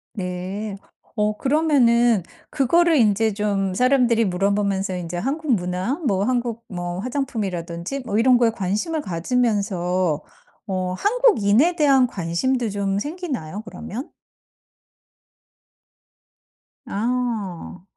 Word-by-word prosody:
네. 190 +2 -4 0.4
어 210 -1 0
그러면은 240 - +3 0.3
그거를 335 +5 +3
인제 220 -2 +3
좀 200 -2 -1
사람들이 245 0 +3
물어 195 +2 +1
보면서 195 -2 -1
인제 175 -1 -5
한국 275 - -1
문화, 180 +6 -2
뭐 195 -5 +1
한국 235 -1 -1
뭐 175 -1 -5
화장품이라든지 210 -4 -3
뭐 220 -5 -2
이런 250 +1 +5
거에 235 -2 +3
관심을 215 - -2
가지면서 185 - 0 0.5
어 185 -2 -2
한국인에 350 - +3
대한 275 -5 +4
관심도 230 +6 -1
좀 200 -1 -1
생기나요, 275 - -5
그러면? 235 - -7 2.8
아. 215 -6 -3
210 Hz, 230 characters per minute, -22 LUFS, 185-255 Hz, 2.8 s, 이런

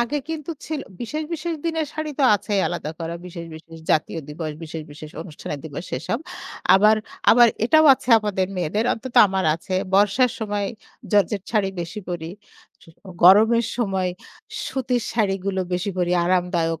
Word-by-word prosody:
আগে 240 +5 0
কিন্তু 320 -1 -4 0.2
ছিল 310 -2 -3 0.2
বিশেষ, 305 +6 -3
বিশেষ 335 +1 -3
দিনের 320 -2 -1
শাড়ি 310 0 -4
তো - - +2
আছেই 205 0 0
আলাদা 170 -3 -4
করা। 165 0 -4
বিশেষ, 170 -1 -8
বিশেষ 165 +1 -12
জাতীয় 155 +1 +1
দিবস 155 +1 -5
বিশেষ, 160 0 -6
বিশেষ 150 +1 -10
অনুষ্ঠানের 150 -3 -7
দিবস 155 +3 -7
এসব। 195 - -2 0.6
আবার 210 +3 +6 0.3
আবার 240 +1 +7 0.2
এটাও 315 +6 +5
আছে 255 - -15
আমাদের 195 -3 -1
মেয়েদের 180 +5 -1
অন্তত 240 +2 -7
আমার 190 0 -1
আছে। 170 +3 -5 0.2
বর্ষার 210 +6 +4
সময় 205 -3 -2 0.5
জর্জেট 205 -1 +2
শাড়ি 205 -4 +2
বেশি 175 +5 -6
পড়ি। 170 -2 -4 0.5
স - - -17 0.4
গরমের 220 +5 +6
সময় 190 -6 0 0.6
সুতির 255 -2 -1
শাড়িগুলো 195 -3 0
বেশি 180 +3 -1
করে 175 -1 +1
আরামদায়ক। 175 -2 0
195 Hz, 155 wpm, -22 LUFS, 170-235 Hz, 0.6 s, আবার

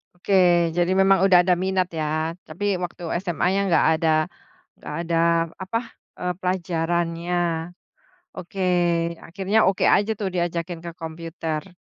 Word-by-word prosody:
Oke, 180 +3 -3 0.4
jadi 175 +1 +2
memang 195 -1 +4
udah 180 -2 +5
ada 180 - +4
minat 185 +1 0
ya, 155 +1 -1
tapi 165 +6 -5 0.2
waktu 175 0 -6 0.2
SMA-nya 185 +1 0
nggak 165 - +4
ada 160 0 +1 0.7
nggak - - -8
ada 170 0 -1 0.4
apa 190 +4 -2 0.4
eee, 180 0 -1
pelajarannya. 170 -1 -1 1.0
Oke, 185 +2 -7 0.7
akhirnya 195 +5 0
oke 190 0 +1
aja 205 +2 0
tuh 200 - 0
diajakin 170 -1 -2
ke 170 - -5
komputer. 165 +1 -5
175 Hz, 125 wpm, -23 LUFS, 165-190 Hz, 1.0 s, udah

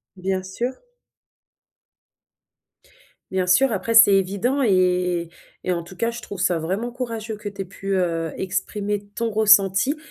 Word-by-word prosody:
Bien 190 0 -2
sûr. 235 +7 -3 2.6
Bien 185 -1 0
sûr, 250 +8 +4
après 215 +3 -2
c'est 225 -3 +8
évident 200 +8 +1
et 235 - +2 0.5
et 170 - -10 0.4
et 185 - 0
en 170 -1 -1
tout 175 +3 -13
cas 230 +5 -1
je 235 -1 -8
trouve 200 - -8
ça 180 -3 +1
vraiment 195 +9 -3
courageux, 225 -3 -5
que 210 - -8
tu 200 -1 -7
aies - - -4
pu, 195 +1 -4
heu, 165 -3 -1
exprimer 205 +2 -3
ton 230 -1 -1
ressenti 210 +5 +4
200 Hz, 155 wpm, -22 LUFS, 185-225 Hz, 2.6 s, c'est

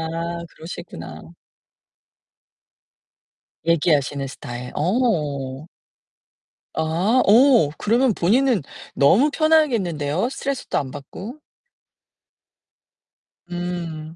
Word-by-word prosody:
아 170 +1 -3 0.2
그러시구나. 170 +2 -9 2.4
얘기하시는 145 -4 +1
스타일. 125 -1 -8
어. 150 - -1 1.1
아 180 +11 +1
오 235 - +6
그러면 235 +2 +2
본인은 230 +4 +2 0.3
너무 200 - +5
편하겠는데요, 230 - +1
스트레스도 275 0 -3
안 135 - -2
받고. 200 - -9 2.1
음. 170 -3 -5
175 Hz, 170 characters per minute, -22 LUFS, 150-240 Hz, 2.4 s, 오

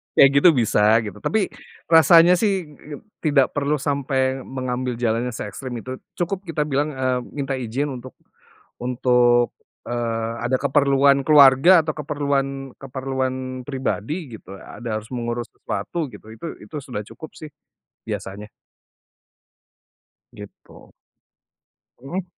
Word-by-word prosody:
Kayak 135 - +8
gitu 175 - +7
bisa, 115 -4 +2 0.2
gitu. 105 -1 -8
Tapi, 210 - 0 0.4
rasanya 170 +2 +7
sih 190 -9 -1 0.4
tidak 145 -4 +2
perlu 145 +1 0
sampai 135 -2 -1
mengambil 130 -1 -4
jalannya 120 +1 -1
seekstrim 120 +5 -6
itu. 130 0 -7 0.2
Cukup 185 +2 -3
kita 155 -2 -1
bilang, 145 0 -1
eee, 130 -1 0 0.2
minta 135 -2 -2
izin 130 +5 -2
untuk 130 0 -9 0.6
untuk, 120 -1 +2 0.3
eee, 115 -1 -2 0.2
ada 130 - +1
keperluan 140 0 +3
keluarga 150 +4 +7
atau 155 - -2
keperluan 140 -2 -2
keperluan 130 -1 -4
pribadi 135 - -4
gitu. 95 - -12
Ada 115 +3 -6
harus 110 +4 -16
mengurus 120 -1 -4
sesuatu, 165 -3 -4
gitu. 110 -3 -13
Itu 115 +9 -8 0.2
itu - - -12
sudah 125 -6 -6
cukup 155 +9 -12
sih, 155 -1 -10 0.6
biasanya. 100 +2 -6 1.9
Gitu. 105 -1 -14 1.1
Mhm. 175 +8 -5
135 Hz, 120 wpm, -22 LUFS, 120-145 Hz, 1.9 s, Kayak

